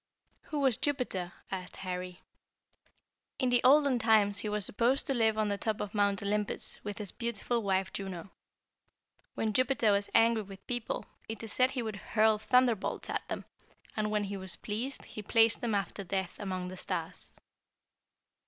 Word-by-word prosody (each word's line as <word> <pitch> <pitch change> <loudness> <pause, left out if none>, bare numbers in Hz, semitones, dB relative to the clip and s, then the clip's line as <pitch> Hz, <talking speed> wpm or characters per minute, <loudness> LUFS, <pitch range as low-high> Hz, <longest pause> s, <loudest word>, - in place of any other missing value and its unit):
"Who 300 -3 -3
was 265 -5 +3
Jupiter?" 245 -11 -1 0.2
asked 185 -2 -5
Harry. 180 -1 -5 1.1
"In 255 - +1
the 245 -1 +3
olden 280 -1 +5
times, 215 -3 +4
he 210 - -3
was 210 -2 +1
supposed 240 +6 +2
to 275 - +3
live 220 -3 +2
on 215 -1 +1
the 200 0 -1
top 220 -2 -1
of 205 -1 -4
Mount 200 -2 +1
Olympus, 210 +1 +1
with 205 -1 -5
his 205 -4 -3
beautiful 235 0 -1
wife 190 -2 0
Juno. 190 -2 -6 1.0
When 220 -1 -1
Jupiter 255 -2 +3
was 200 0 +1
angry 230 -1 +5
with 195 -1 -11
people, 240 -2 -3 0.2
it 225 0 -5
is 220 - -6
said 255 0 +4
he 260 -3 -3
would 215 -3 -4
hurl 215 +1 +2
thunderbolts 245 -2 +1
at - - -3
them, - - -5 0.5
and 215 -1 0
when 210 -1 +1
he 200 0 -4
was 190 -2 -4
pleased 235 +6 -4
he 215 - -7
placed 225 +1 +4
them 230 -3 0
after 200 0 -2
death 190 0 -2
among 185 -3 -3
the 185 - -8
stars." - - -4
210 Hz, 170 wpm, -31 LUFS, 195-235 Hz, 1.1 s, olden